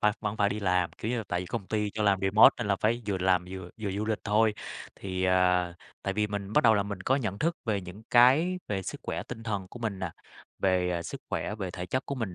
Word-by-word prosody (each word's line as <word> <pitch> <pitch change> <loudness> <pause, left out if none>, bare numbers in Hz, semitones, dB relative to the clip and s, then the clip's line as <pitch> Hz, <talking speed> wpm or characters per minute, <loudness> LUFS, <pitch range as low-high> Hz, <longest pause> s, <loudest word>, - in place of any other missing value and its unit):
phải 105 0 +4
vẫn 105 0 -2
phải 100 -2 +3
đi 105 - -3
làm, 90 -2 +1
kiểu 110 - -2
như 125 - 0
là, 110 - -4
tại 90 0 0
vì 90 - -6
công 95 0 -4
ty 105 -2 -1
cho 110 +1 -3
làm 100 -2 +3
remote 95 +3 +7
nên - - -2
là 100 -1 +2
phải 115 +4 0
vừa 100 -2 0
làm 90 -1 +2
vừa 95 -2 -7
vừa 100 -2 -2
du 100 +2 -2
lịch 110 -1 -1
thôi. 105 +1 +3 0.5
Thì, 95 -1 -2
à, 90 -1 +3 0.3
tại 100 - -1
vì 105 +1 +1
mình 100 0 -5
bắt - - +3
đầu 110 -2 +7
là 100 - +2
mình 100 -2 -6
có 130 +8 +2
nhận 105 -7 -2
thức 165 +2 0
về 105 -4 0
những 90 +4 -10
cái 145 +10 +5
về 95 -2 -1
sức - - -6
khỏe - - -3
tinh 115 - -8
thần 100 -4 -3
của 120 - -10
mình 110 -5 -3
nà, 95 -3 -3 0.5
về, 90 -2 +2
ờ, 85 -1 -1
sức - - -7
khỏe, 105 - -2
về 95 -4 -4
thể 90 0 -6
chất 130 +9 -2
của 140 - -2
mình 110 -9 -4
100 Hz, 275 wpm, -29 LUFS, 95-110 Hz, 0.5 s, remote